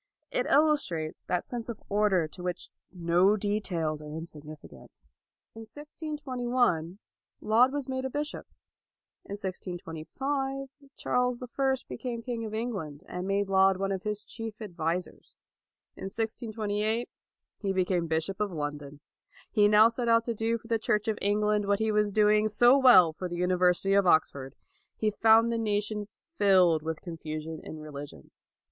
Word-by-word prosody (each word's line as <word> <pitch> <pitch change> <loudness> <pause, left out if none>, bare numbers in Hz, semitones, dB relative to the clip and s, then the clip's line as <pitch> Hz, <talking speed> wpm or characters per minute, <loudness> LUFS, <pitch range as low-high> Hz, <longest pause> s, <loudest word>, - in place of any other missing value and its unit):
It - - 0
illustrates 280 - +1
that 180 - -1
sense 240 -1 -5
of 230 - -5
order 200 -5 +2
to 180 - -11
which 180 0 -4 0.2
no 180 +3 +3
details 180 -7 -2
are 150 0 -9
insignificant. 155 -2 -10 0.6
In 225 - -11
1621, 250 - -2 0.4
Laud 235 +4 +4
was 285 -2 -3
made 260 0 -3
a - - -1
bishop. 295 +3 -4 0.8
In - - -7
1625, 205 - -4 0.3
Charles 250 0 0
the 250 - -7
First 265 +1 -1
became 235 -3 -5
king 235 -2 -4
of 215 - -6
England, 190 -10 -4
and 180 +1 -5
made 200 0 0
Laud 190 0 +4
one 195 +1 -1
of 190 -1 -2
his 210 +1 -4
chief 225 -2 -7
advisers. 175 -4 -4 0.6
In - - -8
1628, 220 +1 -2 0.5
he 195 - -1
became 180 -2 0
bishop 160 +5 -1
of 210 -2 0
London. 145 -2 -5 0.5
He 210 -2 +4
now 210 +1 +7
set 235 +1 -3
out 230 0 +4
to 235 - -1
do 225 +1 0
for 225 - -16
the 225 -1 +1
Church 215 -1 0
of 220 -2 -1
England 210 0 +1
what 200 0 +3
he 220 +1 0
was 210 -1 +2
doing 210 +1 +4
so 240 +4 +5
well 245 -12 +7
for 180 +3 -5
the 175 - -4
University 180 +1 +2
of 200 -2 +4
Oxford. 140 -5 +2 0.4
He 215 -1 +1
found 225 +2 +5
the 230 - -1
nation 210 -1 -1 0.3
filled 185 -5 +5
with 160 0 -4
confusion 160 -2 -6
in 155 - -8
religion. 145 - -9
205 Hz, 155 wpm, -28 LUFS, 175-230 Hz, 0.8 s, now